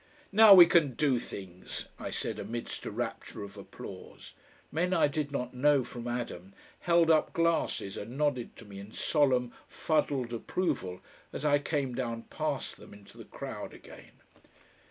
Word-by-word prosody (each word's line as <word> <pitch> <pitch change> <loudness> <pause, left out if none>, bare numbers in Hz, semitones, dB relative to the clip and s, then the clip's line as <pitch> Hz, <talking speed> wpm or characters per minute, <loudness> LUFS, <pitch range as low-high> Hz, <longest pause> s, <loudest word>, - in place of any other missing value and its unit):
"Now 210 0 +9
we 175 -2 +11
can 155 -7 +3
DO 135 -3 +2
things!" 95 -5 -8
I - - -5
said - - -3
amidst 120 0 -5
a - - -4
rapture - - -5
of 100 0 -10
applause. 100 - -10 0.4
Men 180 +4 +1
I 165 - +4
did 145 -1 -3
not 125 -3 -3
know 140 +1 +3
from 120 0 -7
Adam 110 -6 -5 0.2
held 170 -1 +4
up 155 -1 +3
glasses 165 -12 0
and 115 +6 -7
nodded 145 -5 0
to 115 - -13
me 100 -1 -10
in 100 +3 -11
solemn 130 -5 +2
fuddled 140 -6 0
approval 95 - -2 0.3
as 150 - -5
I 145 -1 +4
came 140 -3 -2
down 115 -2 -3
past - - -3
them - - -13
into 100 -1 -16
the - - -11
crowd - - -7
again. - - -14
130 Hz, 160 wpm, -30 LUFS, 115-155 Hz, 0.4 s, we